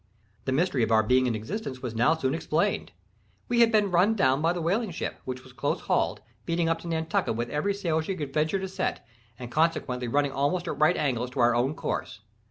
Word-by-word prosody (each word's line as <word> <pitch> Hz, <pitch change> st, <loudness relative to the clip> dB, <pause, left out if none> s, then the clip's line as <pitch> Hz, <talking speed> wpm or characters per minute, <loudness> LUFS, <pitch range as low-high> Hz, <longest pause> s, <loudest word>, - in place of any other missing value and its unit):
The 130 Hz, -, -1 dB
mystery 140 Hz, -1 st, +1 dB
of 115 Hz, -, +1 dB
our 110 Hz, -1 st, +5 dB
being 125 Hz, +3 st, +3 dB
in 120 Hz, -, 0 dB
existence 130 Hz, -, -5 dB
was 120 Hz, -3 st, -3 dB
now 120 Hz, +8 st, +3 dB
soon 135 Hz, -4 st, -1 dB
explained. 160 Hz, -, 0 dB, 0.6 s
We 240 Hz, 0 st, +1 dB
had 230 Hz, -1 st, +6 dB
been 210 Hz, -3 st, +3 dB
run 185 Hz, +6 st, +4 dB
down 135 Hz, -7 st, +2 dB
by 165 Hz, +1 st, +3 dB
the 175 Hz, -, -3 dB
whaling 195 Hz, +7 st, 0 dB
ship, 170 Hz, -, -5 dB
which 130 Hz, 0 st, -5 dB
was 130 Hz, -, -15 dB
close 135 Hz, +2 st, -1 dB
hauled, -, -, 0 dB, 0.2 s
beating 170 Hz, 0 st, 0 dB
up 165 Hz, 0 st, +1 dB
to 170 Hz, -, -9 dB
Nantucket 160 Hz, -7 st, -1 dB
with 120 Hz, +1 st, -3 dB
every 195 Hz, +7 st, 0 dB
sail 170 Hz, -6 st, 0 dB
she 190 Hz, +4 st, -3 dB
could 145 Hz, -5 st, -5 dB
venture 155 Hz, +4 st, +1 dB
to 190 Hz, 0 st, -3 dB
set, 185 Hz, -, -3 dB, 0.3 s
and 120 Hz, -1 st, -8 dB
consequently 150 Hz, -6 st, 0 dB
running 145 Hz, +3 st, +1 dB
almost 145 Hz, +7 st, 0 dB
at 145 Hz, -, -4 dB
right 155 Hz, +4 st, +4 dB
angles 125 Hz, -4 st, 0 dB
to 130 Hz, -, -7 dB
our 120 Hz, 0 st, +5 dB
own 125 Hz, +5 st, +1 dB
course. -, -, -4 dB
150 Hz, 225 wpm, -27 LUFS, 130-175 Hz, 0.6 s, had